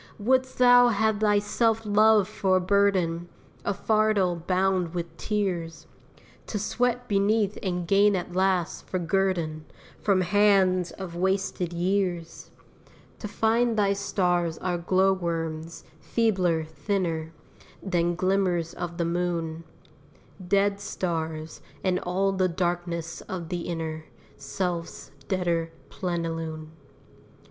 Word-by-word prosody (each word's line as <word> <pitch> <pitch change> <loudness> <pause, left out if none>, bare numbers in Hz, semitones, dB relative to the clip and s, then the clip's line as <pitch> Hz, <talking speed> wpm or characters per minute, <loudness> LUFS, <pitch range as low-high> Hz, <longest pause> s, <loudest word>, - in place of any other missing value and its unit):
wouldst 260 +4 +1
thou 245 0 +7
have 220 -2 +1
thy 210 -1 +3
self 225 +2 +1
love 210 -1 +4
for 190 -2 +1
a - - +2
burden, 185 -3 +1 0.3
A - - 0
fardel 215 -3 +2
bound 185 -2 +1
with 170 -1 -4
tears, 170 -6 -2 0.6
To 215 - -3
sweat 245 +4 -1
beneath 205 0 +1
and 180 -3 -2
gain 200 +2 +4
at 180 -1 -4
last, 185 -2 0
for 185 - -2
guerdon, 170 -3 0 0.4
From 195 -3 +2
hands 190 -2 +3
of 185 -3 -8
wasted 190 -1 -1
years? 175 -1 -2 0.7
To 210 - -5
find 225 +2 +1
thy 200 -1 +3
stars 175 -4 0
are 180 -2 -2
glow 190 +2 +3
worms, 165 -2 -4 0.2
feebler, 185 -8 +1
thinner 160 0 -2 0.5
Than 175 -2 0
glimmers 185 -2 0
of 170 -1 -5
the 170 - 0
moon: 170 -1 -2 0.8
Dead 200 +1 +2
stars, 160 -5 -4 0.2
and 185 -1 +1
all 190 +2 0
the 185 -1 +1
darkness 175 -1 -2
of 175 -3 -5
the 175 -1 -3
inner 160 -2 -4 0.3
Self's 170 +4 -4 0.2
deader 170 -3 0 0.2
plenilune. 165 -3 -4
185 Hz, 120 wpm, -26 LUFS, 170-200 Hz, 0.8 s, thou